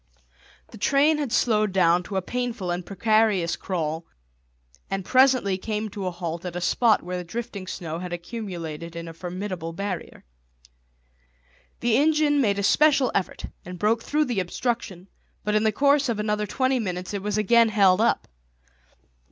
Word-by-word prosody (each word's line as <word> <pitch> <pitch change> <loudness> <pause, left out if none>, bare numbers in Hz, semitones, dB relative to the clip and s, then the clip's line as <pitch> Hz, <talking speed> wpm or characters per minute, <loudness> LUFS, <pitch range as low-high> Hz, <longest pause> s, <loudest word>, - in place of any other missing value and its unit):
The 220 - -11
train 290 +6 +3
had 285 -6 -2
slowed 215 -4 +2
down 180 -2 +3
to 200 - -6
a 190 - 0
painful 240 -5 -3
and 175 +1 -2
precarious 205 -2 +2
crawl 165 -3 -3 0.8
and 195 -1 -3
presently 255 -7 +3
came 215 +1 -3
to 195 -2 -5
a - - +1
halt 170 -1 -5
at 180 -1 -6
a - - -2
spot 220 +5 +2
where 180 +1 -4
the 180 - -4
drifting 200 0 -6
snow 165 -3 -5
had 180 0 -6
accumulated 170 -4 -6
in 170 0 -6
a 165 - -8
formidable 180 -1 -5
barrier. 195 0 -5 1.6
The 235 -1 +3
engine 300 0 +3
made 200 -5 +1
a 200 - -1
special 285 +4 +4
effort 190 - -2 0.2
and 180 0 -8
broke 220 +5 +1
through 300 +5 +1
the 240 -7 -1
obstruction, 190 -1 -3 0.4
but 210 - -1
in 215 - +3
the 220 - +4
course 280 +4 +3
of 225 -3 -1
another 210 0 -1
twenty 260 +4 +1
minutes 185 -3 -4
it 200 - -3
was 210 +1 -2
again 230 +2 +4
held 200 -2 +4
up. 235 - +1
205 Hz, 170 wpm, -25 LUFS, 180-235 Hz, 1.6 s, special